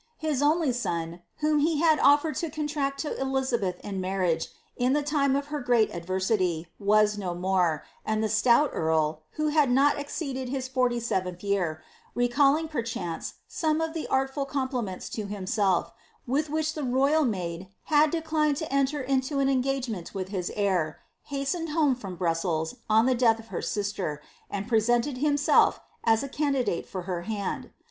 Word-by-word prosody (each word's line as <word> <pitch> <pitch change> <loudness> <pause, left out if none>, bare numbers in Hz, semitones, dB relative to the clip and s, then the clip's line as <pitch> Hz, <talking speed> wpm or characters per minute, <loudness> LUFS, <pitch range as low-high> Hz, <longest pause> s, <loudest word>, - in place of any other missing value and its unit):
His 305 -4 -1
ooly 300 -2 +3
son, 170 -7 -3 0.2
whom 300 0 +3
he 310 +1 +2
had 315 -2 +4
oflered 290 +1 +4
to 335 - -2
contract 295 -2 -2
to 300 - -3
Elizabeth 260 -9 -1
in 195 -2 -4
marriage, 185 -3 0 0.3
in 250 +2 +1
the 295 0 +1
time 280 -2 +2
of 280 +1 -2
her 295 - -1
great 245 -3 +2
adversity, 185 -1 0
was 210 0 +3
no 180 -3 -3
more, 180 -3 +1 0.2
and 220 0 0
the - - +2
stout 235 +7 +4
earl, 155 -1 0
who 305 0 0
kid 295 -3 +4
not 275 +4 +3
exceeded 275 -3 -4
his 260 -1 -3
forty 250 -2 +1
seventh 185 -6 -2
year, 180 -6 -1 0.3
recalling 275 +6 +3
perchance 230 - -4
some 310 -1 0
of 320 0 -2
tbe 325 - -4
artful 270 +1 0
compliments 260 -8 -3
to 215 -2 -4
himself, 200 -2 0 0.3
with 290 +5 0
which 315 +1 -1
the 305 - -4
royal 275 +5 +3
maid 185 -6 -3 0.2
had 300 0 +4
de 325 +1 -2
diaed 305 -2 +1
to 315 -3 -4
enter 275 +1 +1
into 265 +2 0
an 275 0 +2
engagement 255 -8 -1
with 190 -1 -3
his 185 -3 -3
heir, 185 -7 0 0.3
hastened 285 +4 -2
home 300 -3 +3
from 200 -7 -7
Bruisela, 165 -2 -1 0.2
on 220 +2 +5
the 260 - +3
death 235 -2 +4
of 225 0 -13
her - - -3
sister, 200 -7 -2 0.3
and 200 +1 -4
presented 240 +3 +2
himself 290 0 +3 0.2
as 225 +1 +3
a - - -3
candi 275 -2 0
dite 170 - -2
for 185 -2 -5
her 175 -1 -3
hand. 205 +1 -4
245 Hz, 170 wpm, -27 LUFS, 190-285 Hz, 0.3 s, on